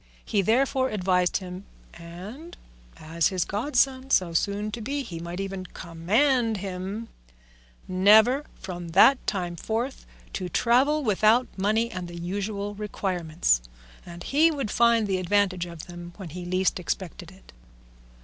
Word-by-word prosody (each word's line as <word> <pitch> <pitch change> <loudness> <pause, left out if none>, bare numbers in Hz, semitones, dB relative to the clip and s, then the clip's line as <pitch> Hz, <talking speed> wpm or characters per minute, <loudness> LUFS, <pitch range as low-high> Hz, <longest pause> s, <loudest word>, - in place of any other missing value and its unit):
He 205 -3 +1
therefore 260 +5 +2
advised 180 -3 +1
him 185 0 -8 0.3
(and, 190 - -10 0.4
as 160 +1 0
his 185 -3 -1
godson 260 +4 0
so 180 -9 +2
soon 205 +5 -1
to 230 - -5
be, 280 +5 -2
he 170 -9 -7
might 170 +2 -6
even 195 -1 -4
command 220 - +1
him) 195 +3 -5 0.8
never 215 +9 +5
from 175 -2 -6
that 265 +6 +7
time 175 -3 -2
forth 230 - -3 0.3
to 185 -2 -3
travel 265 - +3
without 220 +2 +3
money 220 +4 +1
and 180 -1 -5
the 175 0 -9
usual 200 +3 -3
requirements, 180 - 0 0.4
and 175 0 -10
he 310 +4 +4
would 275 -9 -3
find 235 -2 +4
the 190 -2 0
advantage 185 -1 +1
of 170 -2 -9
them 175 0 -10
when 190 -5 -8
he 175 +3 -7
least 185 +1 0
expected 180 0 -4
it. 190 - -18
195 Hz, 140 wpm, -26 LUFS, 180-230 Hz, 0.8 s, that